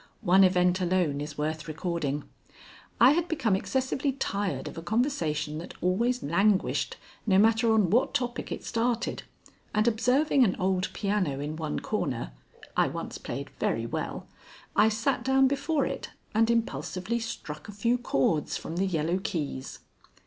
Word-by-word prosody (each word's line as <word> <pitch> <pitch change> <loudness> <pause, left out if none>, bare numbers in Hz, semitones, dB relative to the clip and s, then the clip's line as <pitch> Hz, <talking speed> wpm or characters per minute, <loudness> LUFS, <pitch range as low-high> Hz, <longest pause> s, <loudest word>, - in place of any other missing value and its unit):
One 190 0 +6
event 180 0 +3
alone 175 -5 +1
is 150 0 -6
worth 155 +1 -2
recording. 155 -3 -2 0.8
I - - +8
had 340 +3 +1
become 265 - +1
excessively 265 +6 -1
tired 205 -7 -2
of - - -7
a 165 - -6
conversation 165 - -1
that 170 - -9
always 235 +7 +1
languished, 195 +6 +1 0.3
no 190 -2 +5
matter 225 +2 +4
on 210 -6 +3
what 245 +4 +2
topic 245 -3 -2
it - - -4
started, 235 0 -1 0.5
and, 215 +2 +3
observing 255 +5 +3
an 195 -6 +2
old 185 0 0
piano 195 -9 0
in 150 +2 -4
one 155 -2 -3
corner - - -2 0.4
I - - +4
once - - -5
played - - -6
very - - 0
well - - -4 0.5
I 215 - +6
sat 230 +3 0
down 265 +1 +4
before 280 +2 0
it - - -4 0.2
and 225 +1 +3
impulsively 195 0 -1
struck 210 -6 -6
a - - -5
few 235 +5 +1
chords 150 - +1
from 165 - -6
the 195 +2 +1
yellow 170 +1 0
keys. 145 -7 -4
195 Hz, 155 wpm, -28 LUFS, 165-235 Hz, 0.8 s, I